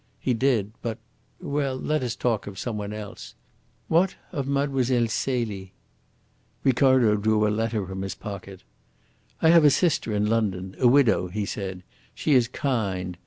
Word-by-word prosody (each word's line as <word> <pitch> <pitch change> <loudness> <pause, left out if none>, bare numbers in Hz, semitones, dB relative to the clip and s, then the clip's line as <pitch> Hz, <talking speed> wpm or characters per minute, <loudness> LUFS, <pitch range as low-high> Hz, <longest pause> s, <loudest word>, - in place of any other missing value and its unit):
He 125 - 0
did, 115 -4 +1
but 115 -2 -3 0.4
well, 140 -2 -2
let 150 +3 -1
us 120 -2 -2
talk 115 -5 -1
of 100 -2 -8
some 115 +3 -3
one 105 -1 -4
else. 105 -1 -8 0.5
What 175 +4 +2 0.2
of 140 -6 -3
Mlle. 140 -1 +1 0.2
Celie?" 110 -5 -2 0.9
Ricardo 130 -4 +4
drew 105 +1 +2
a 105 - +1
letter 110 -2 -1
from 95 +1 -6
his 95 0 -4
pocket. 100 -2 -8 0.8
"I 160 - +6
have 165 -1 +7
a 150 - +8
sister 155 -6 +1
in 105 0 +1
London, 100 -4 -1
a 125 - +5
widow," 120 -8 +4
he 100 +3 -3
said. 95 -2 -5 0.3
"She 155 - +1
is 125 -3 +4
kind. 100 -9 -2
115 Hz, 160 wpm, -25 LUFS, 100-135 Hz, 0.9 s, a